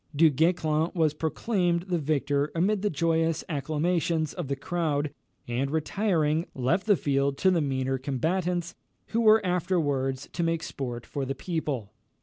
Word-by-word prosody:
Du 160 +1 +6
Guesclin 160 +1 +1
was 160 -3 +2
proclaimed 170 +3 0
the 180 -2 -1
victor 145 -1 0
amid 190 +4 +2
the 210 - +1
joyous 165 0 +1
acclamations 160 +1 0
of 175 -6 -5
the 140 - -1
crowd, 150 -1 -1 0.3
and 125 +3 -1
retiring, 160 -1 0
left 140 - 0
the 205 - +6
field 140 -1 0
to 190 +5 +3
the 170 -3 +2
meaner 135 -2 -1
combatants, 170 +6 -1 0.4
who 230 - +1
were 215 -2 +5
afterwards 145 -7 0
to - - -2
make 165 -1 0
sport 120 -3 -5
for 140 - -4
the 135 +1 -3
people. 145 - -3
160 Hz, 150 wpm, -27 LUFS, 140-175 Hz, 0.4 s, Du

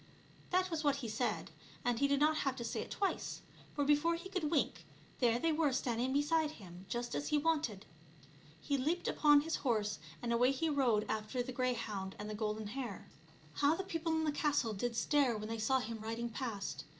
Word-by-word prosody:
That 370 0 +2
was 320 -1 -1
what 285 -2 +3
he 270 -4 -4
said, 220 +3 -2 0.3
and 240 -1 +1
he 280 - +4
did 280 0 +2
not 310 +1 +4
have 270 -3 0
to 240 - -5
say 230 - -2
it - - -7
twice; 395 -1 -2 0.3
for 285 - +1
before 295 +4 +3
he 340 +3 -7
could 360 -6 -1
wink 300 -3 0 0.4
there 235 -2 +4
they 325 +6 +1
were 305 -2 +2
standing 250 0 0
beside 300 +2 +2
him 185 - -12
just 240 0 -3
as 290 - -2
he 300 - +2
wanted. 295 -10 0 0.7
He 280 - -1
leaped 325 +7 0
upon 295 -1 +5
his 325 +2 -1
horse 215 - 0 0.2
and 235 -1 -1
away 250 +3 +4
he 320 +4 0
rode 245 -8 +2
after 220 +3 -2
the 255 - -5
greyhound 230 -6 -2
and 210 - -6
the 215 - -4
golden 215 0 -2
hare. 240 -4 -5 0.4
How 290 +2 +3
the 385 - -3
people 330 -3 -2
in 320 0 +1
the 305 - +1
castle 290 -6 +1
did 230 +4 -2
stare 255 0 +2
when 215 +1 -5
they 225 0 -3
saw 240 +5 +3
him 230 -2 -5
riding 230 +2 -3
past 210 - -4
255 Hz, 210 wpm, -35 LUFS, 225-300 Hz, 0.7 s, upon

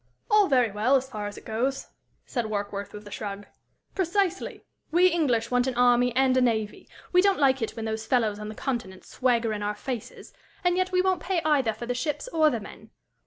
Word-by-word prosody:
"All 420 -2 +6
very 250 -5 +3
well, 215 +7 +2
as 265 0 +1
far 210 -3 -4
as 205 - -8
it - - -12
goes," 255 +5 -2 0.4
said 240 -4 -2
Warkworth, 205 -1 -4
with 210 0 -10
a - - -10
shrug. 205 -1 -5 0.5
"Precisely! 380 0 -1 0.2
We 350 +3 +4
English 255 -10 0
want 245 +1 +2
an 260 - -2
army 245 0 +4
and 260 0 +3
a 255 - +4
navy; 220 -4 -1 0.2
we 360 - +5
don't 395 0 +3
like 270 -2 +3
it 225 - -3
when 225 - -5
those 220 0 -4
fellows 220 -5 +1
on 210 0 -6
the 215 - -8
Continent 215 -9 -4
swagger 235 -3 0
in 210 - -4
our 205 0 -2
faces, 245 0 -7 0.3
and 355 0 +3
yet 370 0 0
we 365 0 +2
won't 375 -2 +1
pay 360 0 0
either 280 -7 +3
for 220 +3 -7
the 245 - -1
ships 295 - -3
or 315 -7 +4
the 240 -5 -2
men. 205 - -12
245 Hz, 215 wpm, -26 LUFS, 220-305 Hz, 0.5 s, All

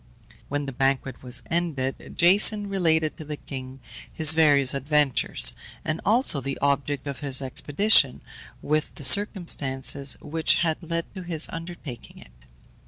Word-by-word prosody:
When 145 0 -3
the 135 - -6
banquet 135 -1 -2
was 125 -1 -2
ended, 155 -6 -3
Jason 205 +4 +4
related 160 -5 0
to 160 - -8
the 150 0 -7
king 130 -1 -9 0.3
his 160 -1 +5
various 145 -4 +4
adventures, 140 -1 +1 0.3
and 155 +1 -3
also 215 - +2
the 135 0 -5
object 140 0 -2
of 140 -2 -6
his 140 -2 -4
expedition, 140 - +2 0.4
with 155 +1 -2
the 145 - -5
circumstances 140 - +3
which 160 +1 0
had 160 -1 -1
led 170 0 -3
to 190 - -8
his 170 -3 0
undertaking 165 -7 -9
it. 60 - -15
150 Hz, 140 wpm, -24 LUFS, 135-170 Hz, 0.4 s, his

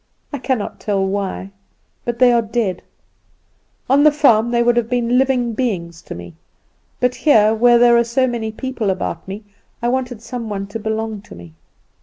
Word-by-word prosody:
I 285 - -3
cannot 250 -5 -2
tell 195 -2 0
why, 195 0 -3 0.5
but 240 -1 -2
they 250 0 +5
are 235 -1 +3
dead. 220 -5 -2 1.1
On 275 +3 +4
the 305 - +7
farm 240 -6 +3
they 235 0 +2
would 240 0 +3
have 235 -1 0
been 245 0 +1
living 255 -3 +1
beings 175 -9 -3
to - - -9
me; 85 -1 -10 0.7
but 250 0 +1
here, 220 -9 +4
where 240 +2 +5
there 240 0 +5
were 235 0 +5
so 245 +3 +1
many 235 -3 -3
people 240 -2 -3
about 185 -3 -3
me, 200 +3 -7 0.4
I 240 - -1
wanted 250 -3 -3
some 235 -2 -6
one 195 -1 -3
to 225 - -5
belong 220 -1 -3
to - - -13
me. 85 -2 -13
235 Hz, 185 wpm, -19 LUFS, 205-245 Hz, 1.1 s, the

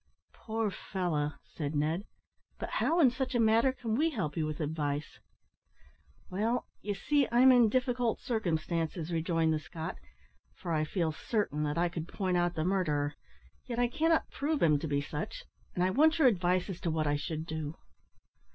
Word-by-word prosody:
"Poor 220 -2 -2
fellow!" 160 -7 -2
said 150 -1 -5
Ned; 160 +7 0 0.5
"but - - -5
how, 350 -9 +1
in 270 -7 +6
such 260 +1 -3
a - - +3
matter, 230 +3 +4
can 235 -4 -4
we 310 +8 +3
help 190 - -3
you 155 -2 0
with 155 -1 -4
advice?" 150 -1 -2 1.1
"Well, 225 +6 0 0.2
you 205 -1 -2
see 285 +6 +2
I'm 250 +2 +7
in 240 -3 +6
difficult 245 -1 +1
circumstances," 170 -5 -2
rejoined 165 -1 +1
the 155 - 0
Scot, 160 +1 -6 0.6
"for 175 - -5
I 155 -1 +1
feel 165 0 0
certain 160 -2 -1
that 150 +1 -2
I 175 +1 +3
could 170 -1 -5
point 185 -2 -1
out 175 -1 +1
the 155 - 0
murderer, 155 -6 +1 0.5
yet 240 -2 -4
I 245 0 +3
cannot 320 +5 +1
prove 300 +1 -1
him 150 -3 +4
to 160 - -3
be 140 -1 0
such, 150 +1 -5 0.3
and 180 - +1
I 185 - +2
want 315 - +4
your 310 -5 +6
advice 180 -4 +2
as 190 -3 -6
to 170 - -1
what 155 -1 0
I 145 0 +2
should 155 +2 -3
do." 155 -1 -4
180 Hz, 180 wpm, -31 LUFS, 155-235 Hz, 1.1 s, I'm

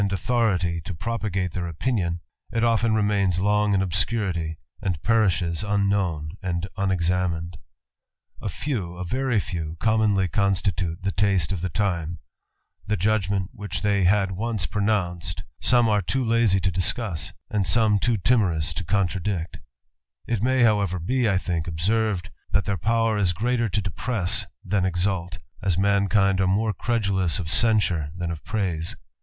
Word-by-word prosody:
authority 95 -5 +1
to 85 +3 -6
propagate 100 -3 -2
their 90 0 -3
opinion, 85 -1 -1 0.3
it 115 - 0
often 115 -1 +3
re 105 -2 +2
in 100 +2 +2
obscurity, 90 -4 -1 0.2
and 90 -5 -1
perishes 95 -6 +2
unknown 100 -7 0
and 90 -2 -2
unexa 90 -2 0 0.9
few, 100 -12 -3
a 90 - -4
very 125 +4 0
few, 85 -5 -4
commonly 110 -3 +2
constitute 90 -2 0
the 95 - 0
taste 95 -4 +1
of 90 -4 -2
the 90 +2 -4
judgment 100 -1 0
which 105 +1 -5
they 100 -2 +2
had 95 +1 +3
once 105 -1 -2
pronounced 95 -2 -1 0.6
too 130 0 0
lazy 115 -4 +3
to 95 +1 0
discuss, 90 0 -1 0.2
and 100 -4 0
some 110 +1 +3
too 115 +2 +1
timorous 95 -7 +2
to 95 - -4
co 100 +3 +2 1.4
may 130 +1 +3
however 100 -5 +2
be, 120 +7 +1
I 95 - +2
think, 85 -3 -2
observed, 95 +3 0 0.2
that 100 - +2
thai 110 +2 +1
greater 115 +3 0
to 105 +2 0
depress 100 +2 -1 0.2
than 95 0 +1
exalt, 90 -1 -1 0.2
as 95 -3 +1
mankind 100 0 +3 0.4
credulous 100 -8 +1
of 80 -4 -4
censure 100 -10 +3
than 85 -1 -2
of 80 -2 -6
praise. 90 -7 -2
95 Hz, 125 wpm, -24 LUFS, 90-110 Hz, 1.4 s, often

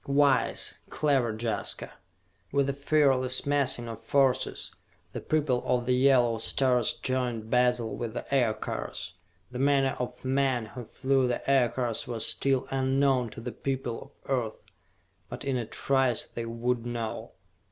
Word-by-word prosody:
Wise, 140 -1 +2
clever 135 -6 +1
Jaska!" 110 -1 -3 0.6
With 140 -1 +2
a 140 - 0
fearless 135 -3 +2
massing 140 -4 +2
of 115 -1 -7
forces, 135 -2 +1 0.4
the - - -4
people 145 -5 +1
of 125 -1 0
the 125 - +2
yellow 125 -3 +4
stars 125 0 +2
joined 125 -4 -2
battle 125 -2 +2
with 115 -1 -5
the - - -4
Aircars! 110 - -1 0.4
The 125 - -5
manner 135 -1 +3
of 125 +1 -5
men 130 -3 +1
who 120 +2 -9
flew 135 +2 +1
the 120 - -3
Aircars 120 -3 +1
was 115 -2 -1
still 135 -1 +1
unknown 135 -2 +2
to 115 - -9
the 125 +1 -5
people 135 0 -4
of - - -7
Earth. 120 -5 -1 0.7
But - - -7
in 135 -1 0
a 120 -3 -2
trice 130 -1 +1
they 115 - -6
would 115 +1 -1
know. 120 -2 -4
125 Hz, 145 wpm, -28 LUFS, 120-135 Hz, 0.7 s, yellow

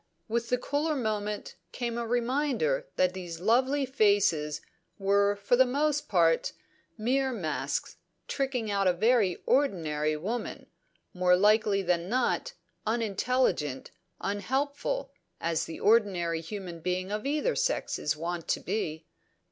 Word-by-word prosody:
With 235 +1 -1
the 250 - +2
cooler 290 +5 -1
moment 210 -4 -3
came 235 -2 -3
a 235 -1 -3
reminder 290 - 0
that 180 0 +2
these 175 -3 -6
lovely 260 +8 +2
faces 200 - +2 0.4
were 200 +1 +3
for 200 +4 +2
the 260 - +7
most 295 +3 0
part 165 -4 +3 0.4
mere 260 +4 +1
masks, 175 -10 -3 0.3
tricking 255 -6 -1
out 200 -1 +2
a 180 - +4
very 210 -1 +3
ordinary 155 - +1
woman, 220 +10 -4 0.5
more 180 0 +4
likely 210 0 +3
than 175 0 0
not 255 - 0 0.3
unintelligent, 215 - 0 0.3
unhelpful, 275 - -2 0.3
as 165 -1 0
the 165 - -7
ordinary 190 -7 +2
human 175 -1 -7
being 185 +3 -2
of 210 +5 -2
either 305 - 0
sex - - 0
is 150 +1 -1
wont 170 +1 -4
to - - +1
be. 160 -6 -3
210 Hz, 130 wpm, -29 LUFS, 180-255 Hz, 0.5 s, the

